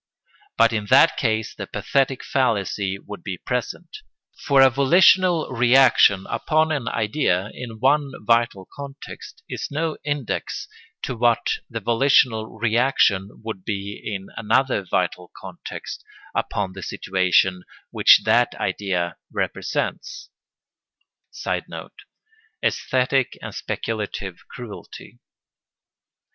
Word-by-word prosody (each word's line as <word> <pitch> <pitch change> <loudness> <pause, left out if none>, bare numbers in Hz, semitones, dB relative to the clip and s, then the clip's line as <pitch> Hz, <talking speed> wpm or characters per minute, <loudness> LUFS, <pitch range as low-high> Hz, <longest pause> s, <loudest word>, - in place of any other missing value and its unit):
But 115 0 +4
in 105 -2 -2
that 165 - +6
case 110 -3 -1
the - - -7
pathetic 135 -1 0
fallacy 100 -6 0
would 105 +1 -10
be 95 -2 -5
present; 125 - -4 0.5
for 140 -2 +6
a 135 - +7
volitional 175 +5 +4
reaction 125 -5 +5
upon 155 0 +1
an 140 -7 -2
idea 105 -4 0
in 115 -3 -8
one 140 +3 +2 0.2
vital 115 -5 +1
context 140 -1 -10
is - - -5
no 155 +2 -2
index 145 -5 -3 0.4
to 130 - -3
what 120 0 +1
the 115 - -4
volitional 115 0 +3
reaction 110 -4 +1
would 110 -4 -6
be 100 0 -5
in 100 -3 -5
another 125 0 +1
vital 90 -1 -2
context - - -8 0.3
upon 95 -2 -2
the 95 - -9
situation 95 0 +1 0.3
which - - +6
that - - +3
idea 90 -4 -2
represents. - - -3 1.0
[Sidenote: - - -5 0.7
Æsthetic 130 0 +1
and - - -8
speculative 105 -4 -4
cruelty. 115 - -10
115 Hz, 105 wpm, -22 LUFS, 100-135 Hz, 1.0 s, a